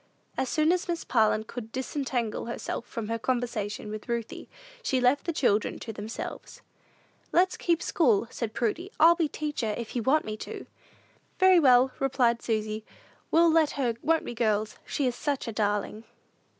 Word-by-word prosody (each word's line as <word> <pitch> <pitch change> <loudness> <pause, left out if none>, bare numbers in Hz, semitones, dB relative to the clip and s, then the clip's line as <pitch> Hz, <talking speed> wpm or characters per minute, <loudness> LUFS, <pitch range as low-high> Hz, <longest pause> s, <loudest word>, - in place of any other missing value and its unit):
As 260 - -1
soon 310 +1 +3
as 365 +1 0
Miss 340 -1 -2
Parlin 220 -2 +2
could 225 0 -8
disentangle 255 -4 -2
herself 235 0 -4
from 225 -2 -5
her 230 +1 -2
conversation 225 -4 -2
with 215 +1 -7
Ruthie, 235 -2 -4 0.3
she 265 - 0
left 250 +3 +2
the 335 - 0
children 220 -9 +1
to 225 - -7
themselves. 215 +2 -7 0.7
"Let's 370 +2 +3
keep 340 -1 0
school," 235 - +3
said 225 -3 -4
Prudy. 305 - -1
"I'll 330 +2 +8
be 340 -2 0
teacher, 290 -8 -3
if 235 0 -6
you 240 - 0
want 275 +7 +2
me 215 0 -4
to." - - -7 0.7
"Very 375 -1 +6
well," 255 -3 +5
replied 250 -3 +2
Susy, 215 -1 -2 0.5
"we'll 335 0 +5
let 315 -2 +3
her; 255 -5 0
won't 325 +1 +2
we, - - -5
girls? 215 -2 0
she 285 - -1
is 250 - +1
such 285 -3 -2
a - - -2
darling." 210 +1 -1
245 Hz, 170 wpm, -28 LUFS, 220-305 Hz, 0.7 s, I'll